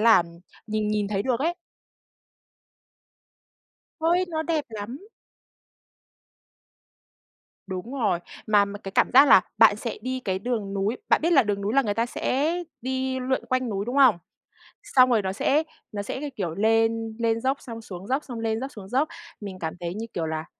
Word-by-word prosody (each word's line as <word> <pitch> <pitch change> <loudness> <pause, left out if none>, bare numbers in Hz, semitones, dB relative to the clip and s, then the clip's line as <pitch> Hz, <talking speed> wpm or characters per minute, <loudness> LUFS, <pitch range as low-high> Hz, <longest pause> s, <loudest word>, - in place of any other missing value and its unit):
là 225 -4 +6 0.4
nhìn 215 -1 -1
nhìn 210 -1 0
thấy 200 -1 -1
được 250 +1 0
ấy. 335 +4 +1 2.5
Ôi, 345 +3 +2
nó 320 -2 -2
đẹp 315 -3 -1
lắm! 230 - -7 2.6
Đúng 190 +7 -5
rồi. 215 -10 +1 0.3
Mà 205 -1 +5
mà 200 0 -7
cái 195 - -7
cảm - - +2
giác 275 +2 +8
là - - +8 0.2
bạn - - +7
sẽ - - -5
đi 260 0 -3
cái 190 -1 0
đường 210 -3 -2
núi 200 +4 -1
bạn - - +4
biết 345 - +3
là 270 -6 +6
đường 205 -1 -1
núi 205 +4 -1
là 275 - +5
người 205 -4 -1
ta 230 +2 +1
sẽ 275 +5 0 0.3
đi 260 +1 -2
lượn 260 +1 -1
quanh 255 -1 0
núi, 200 -1 -2
đúng 245 +3 -3
không? 255 -10 +6 0.7
Xong 255 -1 +5
rồi 225 -4 +3
nó 190 -1 -2
sẽ 285 +9 +2 0.3
nó 205 -2 -3
sẽ 205 - -5
cái 290 0 -4
kiểu 175 -5 -3
lên 225 +1 +1
lên 230 -1 +1
dốc 265 +3 +1
xong 230 -3 -8
xuống 190 -1 -9
dốc, 270 +4 0
xong 245 -4 -7
lên 225 0 -1
dốc 270 +2 -5
xuống 195 -3 -10
dốc. 270 +5 +2 0.3
Mình 190 -3 -7
cảm 160 -1 -3
thấy 175 0 -4
như 225 +1 -4
kiểu 165 - -2
là 160 0 -3
225 Hz, 185 wpm, -25 LUFS, 205-260 Hz, 2.6 s, giác